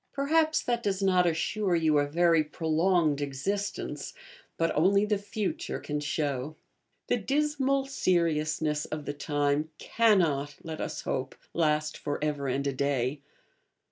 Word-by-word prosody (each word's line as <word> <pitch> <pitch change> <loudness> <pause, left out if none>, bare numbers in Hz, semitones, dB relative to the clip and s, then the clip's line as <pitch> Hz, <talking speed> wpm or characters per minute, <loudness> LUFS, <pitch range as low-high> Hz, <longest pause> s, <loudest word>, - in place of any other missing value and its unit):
Perhaps 315 +3 +2
that 240 -1 0
does 200 -3 -1
not 185 -2 +4
assure 180 +3 0
you 160 -3 +3
a 145 - +1
very 165 +1 +3
prolonged 160 -1 +1
existence, 190 +9 -3 0.4
but 165 0 0
only 200 +6 +4
the 210 -1 0
future 205 0 -3
can 150 0 -3
show. 145 -1 -2 0.5
The 245 - +1
dismal 275 +2 +1
seriousness 155 - 0
of 155 -1 -5
the 145 - -3
time 145 +1 0
cannot, 165 -13 +2
let 160 -2 -5
us - - -4
hope, 130 0 -3 0.2
last 155 -2 +1
for 145 -1 -3
ever 145 -2 -1
and 135 +2 -1
a 140 - 0
day. 135 0 -1
160 Hz, 140 wpm, -28 LUFS, 145-200 Hz, 0.5 s, not